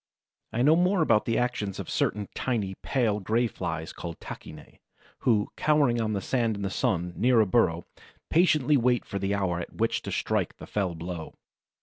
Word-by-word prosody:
I 120 Hz, -, 0 dB
know 150 Hz, +4 st, +6 dB
more 180 Hz, 0 st, +3 dB
about 115 Hz, -7 st, +3 dB
the 115 Hz, -, 0 dB
actions 120 Hz, -6 st, -1 dB
of -, -, -5 dB
certain 105 Hz, 0 st, -1 dB
tiny, 110 Hz, -7 st, -1 dB
pale 115 Hz, -6 st, +1 dB
gray 110 Hz, +5 st, +1 dB
Flies, 80 Hz, -7 st, -4 dB
called 85 Hz, -2 st, -7 dB
Tachinæ, 75 Hz, -1 st, -10 dB, 0.4 s
who, 110 Hz, -4 st, +2 dB
cowering 145 Hz, -6 st, +2 dB
on 110 Hz, -1 st, -1 dB
the 100 Hz, -, -1 dB
sand 115 Hz, 0 st, 0 dB
in 100 Hz, -, -5 dB
the 95 Hz, -, -2 dB
sun, 90 Hz, -1 st, 0 dB
near 120 Hz, +1 st, +3 dB
a 110 Hz, -, +5 dB
burrow, 90 Hz, -5 st, +2 dB, 0.5 s
patiently 155 Hz, -4 st, +4 dB
wait 125 Hz, -1 st, +2 dB
for 100 Hz, -, -4 dB
the 100 Hz, +1 st, 0 dB
hour 90 Hz, -4 st, -1 dB
at 85 Hz, -, -7 dB
which -, -, 0 dB
to -, -, -6 dB
strike -, -, -1 dB
the -, -, -9 dB
fell 95 Hz, -5 st, -2 dB
blow. 85 Hz, 0 st, -6 dB
110 Hz, 190 wpm, -27 LUFS, 95-125 Hz, 0.5 s, know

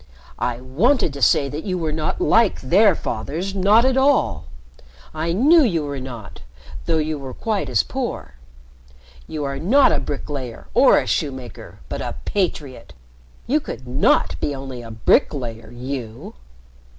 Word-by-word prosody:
"I 120 Hz, -1 st, -2 dB
wanted 175 Hz, -, +1 dB
to 140 Hz, -, -8 dB
say 140 Hz, +4 st, +4 dB
that 145 Hz, +3 st, -5 dB
you 185 Hz, -2 st, -2 dB
were 160 Hz, -3 st, -2 dB
not 155 Hz, -, -2 dB
like 230 Hz, -, +3 dB
their 190 Hz, +7 st, +4 dB
fathers, 155 Hz, -, -4 dB
not 205 Hz, +5 st, +4 dB
at 260 Hz, -1 st, +2 dB
all. 265 Hz, -, +2 dB, 0.7 s
I 160 Hz, +2 st, -2 dB
knew 290 Hz, -, +5 dB
you 175 Hz, -, +1 dB
were 140 Hz, -1 st, -4 dB
not, 120 Hz, -, -9 dB, 0.5 s
though 165 Hz, -1 st, +2 dB
you 155 Hz, -1 st, -2 dB
were 130 Hz, -2 st, -8 dB
quite 205 Hz, -, -2 dB
as 120 Hz, -6 st, +2 dB
poor. -, -, -5 dB, 0.9 s
You 155 Hz, -2 st, -4 dB
are 140 Hz, -1 st, -3 dB
not 255 Hz, -, +4 dB
a -, -, +1 dB
bricklayer 135 Hz, -4 st, -6 dB
or -, -, +6 dB
a -, -, +1 dB
shoemaker, 130 Hz, -, -4 dB
but -, -, -5 dB
a -, -, -4 dB
patriot 165 Hz, -9 st, -3 dB, 0.5 s
you 290 Hz, +6 st, +2 dB
could 130 Hz, -, -8 dB
not 95 Hz, -, +2 dB
be 145 Hz, -, -2 dB
only 135 Hz, -2 st, -7 dB
a 115 Hz, -, -10 dB
bricklayer 115 Hz, +1 st, 0 dB
you!" 120 Hz, -2 st, -7 dB
145 Hz, 155 wpm, -21 LUFS, 125-195 Hz, 0.9 s, or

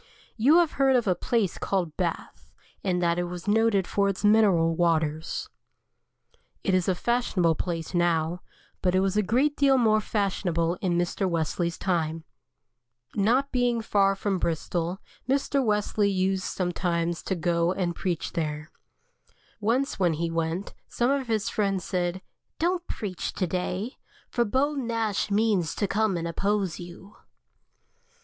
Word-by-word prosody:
You 270 Hz, +9 st, +5 dB
have 345 Hz, -3 st, +4 dB
heard 270 Hz, -1 st, +5 dB
of 240 Hz, -2 st, +2 dB
a 190 Hz, -, +3 dB
place 200 Hz, +1 st, -1 dB
called 175 Hz, -6 st, -1 dB
Bath, 175 Hz, -3 st, -4 dB, 0.3 s
and 180 Hz, -2 st, 0 dB
that 170 Hz, 0 st, +2 dB
it 175 Hz, -, -1 dB
is 175 Hz, +2 st, -7 dB
noted 210 Hz, -2 st, +3 dB
for 200 Hz, +1 st, +1 dB
its 195 Hz, +1 st, -2 dB
mineral 195 Hz, -7 st, +4 dB
waters. 160 Hz, -2 st, 0 dB, 1.2 s
It 195 Hz, -, +1 dB
is 185 Hz, -2 st, +2 dB
a 190 Hz, -, +2 dB
fashionable 195 Hz, -6 st, +1 dB
place 165 Hz, +1 st, -4 dB
now, 175 Hz, 0 st, +1 dB, 0.4 s
but 180 Hz, -1 st, +1 dB
it 185 Hz, -, +4 dB
was 195 Hz, 0 st, 0 dB
a 210 Hz, -, +4 dB
great 260 Hz, +9 st, +1 dB
deal 275 Hz, -2 st, +4 dB
more 215 Hz, -3 st, +3 dB
fashionable 185 Hz, -6 st, 0 dB
in 175 Hz, -3 st, +1 dB
Mr. 175 Hz, +2 st, 0 dB
Wesley's 170 Hz, +1 st, -1 dB
time. 165 Hz, -3 st, -1 dB, 0.9 s
Not 240 Hz, +7 st, +2 dB
being 245 Hz, -2 st, +1 dB
far 200 Hz, -3 st, +2 dB
from 195 Hz, -1 st, -1 dB
Bristol, 170 Hz, +2 st, -2 dB, 0.3 s
Mr. 275 Hz, 0 st, +1 dB
Wesley 210 Hz, -2 st, +1 dB
used 190 Hz, -1 st, 0 dB
sometimes 175 Hz, -2 st, -1 dB
to 190 Hz, -, -2 dB
go 170 Hz, 0 st, +1 dB
and 180 Hz, -2 st, -1 dB
preach 175 Hz, -3 st, -2 dB
there. 150 Hz, -1 st, -3 dB, 0.9 s
Once 235 Hz, +5 st, 0 dB
when 175 Hz, -3 st, +3 dB
he 165 Hz, +2 st, -2 dB
went, 165 Hz, +3 st, -2 dB
some 240 Hz, +2 st, 0 dB
of 275 Hz, -2 st, 0 dB
his 220 Hz, -2 st, 0 dB
friends 195 Hz, -3 st, 0 dB
said: 180 Hz, 0 st, -2 dB, 0.3 s
"Don't 350 Hz, +1 st, 0 dB
preach 190 Hz, -5 st, -4 dB
to 185 Hz, -, -1 dB
day, 185 Hz, +6 st, -3 dB, 0.3 s
for 240 Hz, -2 st, +1 dB
Beau 265 Hz, +7 st, +1 dB
Nash 230 Hz, -7 st, -1 dB
means 200 Hz, -5 st, +1 dB
to 205 Hz, -, 0 dB
come 210 Hz, -2 st, +1 dB
and 170 Hz, 0 st, -3 dB
oppose 195 Hz, +1 st, -1 dB
you." 175 Hz, +3 st, -11 dB
190 Hz, 150 wpm, -26 LUFS, 170-220 Hz, 1.2 s, You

